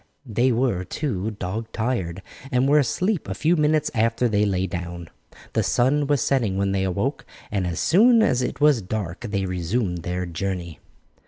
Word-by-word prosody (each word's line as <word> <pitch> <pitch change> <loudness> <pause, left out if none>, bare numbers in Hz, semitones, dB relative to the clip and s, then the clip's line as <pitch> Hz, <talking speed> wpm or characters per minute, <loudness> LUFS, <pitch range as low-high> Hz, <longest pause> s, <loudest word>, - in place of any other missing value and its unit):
They 120 +2 +1
were, 120 -6 +1
too, 110 - -3
dog 110 +5 -4
tired, 95 -7 -2 0.3
and 125 +1 +2
were 150 +2 +5
asleep 180 - 0
a - - -3
few 165 +3 +2
minutes 150 -1 +2
after 115 +2 +1
they 105 -2 +2
lay 95 -2 0
down. 85 -1 -6 0.4
The - - +2
sun 140 +4 +2
was 145 -2 +2
setting 115 -9 +1
when 100 0 +1
they 95 -1 0
awoke, 95 -2 -1 0.3
and 95 -3 -1
as 85 -2 -3
soon 225 +5 +5
as 125 - +2
it 125 - -3
was 145 -5 +4
dark 95 -3 -4
they 100 -2 -1
resumed 90 +1 -1
their 90 +2 -3
journey. 85 -1 -4
110 Hz, 175 wpm, -23 LUFS, 90-130 Hz, 0.4 s, were